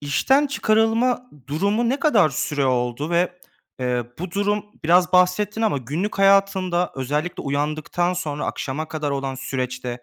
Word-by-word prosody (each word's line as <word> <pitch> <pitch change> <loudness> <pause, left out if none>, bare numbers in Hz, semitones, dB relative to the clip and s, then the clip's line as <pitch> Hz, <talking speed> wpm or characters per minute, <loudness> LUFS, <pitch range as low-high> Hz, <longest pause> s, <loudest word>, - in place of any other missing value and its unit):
işten 265 - +2
çıkarılma 235 0 +1 0.2
durumu 200 +10 0
ne 270 +4 -1
kadar 225 - +4
süre 140 +2 -1
oldu 125 +4 -1
ve, 175 +1 +2 0.5
eee, 125 -1 0
bu 180 0 -5
durum 205 +2 0 0.2
-biraz 175 +2 +4
bahsettin 205 +4 +2
ama 210 -11 +1
günlük 160 - -4
hayatında, 195 -3 +3
özellikle 150 +6 -2
uyandıktan 155 +5 -1
sonra 150 -5 -3
akşama 150 +4 -4
kadar 150 -2 -3
olan 135 -1 -2
süreçte, 125 -2 -4
175 Hz, 140 wpm, -22 LUFS, 140-205 Hz, 0.5 s, kadar